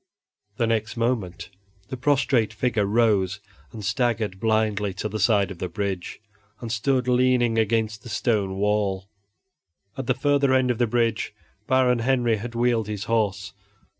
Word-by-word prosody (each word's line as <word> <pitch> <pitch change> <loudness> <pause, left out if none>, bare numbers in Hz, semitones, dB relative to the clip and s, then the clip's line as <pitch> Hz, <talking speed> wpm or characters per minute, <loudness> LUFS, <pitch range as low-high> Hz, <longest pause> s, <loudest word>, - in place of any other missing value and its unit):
The 115 - +1
next 110 0 -1
moment 110 -7 -2 0.4
the - - -4
prostrate 130 -4 +1
figure 110 -2 0
rose 100 -4 +2 0.3
and 110 -4 -8
staggered 110 -2 -1
blindly 110 -3 0
to 100 - -3
the 110 +1 -5
side 100 -1 +2
of 90 - -9
the 90 - -3
bridge, 100 -4 -4 0.4
and 115 -2 -6
stood 125 +3 0
leaning 125 -2 +3
against 110 -1 0
the 120 - -11
stone 105 -3 0
wall. 100 -1 0 0.9
At 135 -2 -5
the 130 - +2
further 140 0 +2
end 130 -1 +3
of 120 - -4
the 120 - +2
bridge 115 -2 0 0.3
Baron 130 -2 +3
Henry 120 -2 +1
had 120 +3 -7
wheeled 120 -2 +1
his 105 -2 -4
horse. 105 -2 -1
115 Hz, 155 wpm, -24 LUFS, 105-125 Hz, 0.9 s, leaning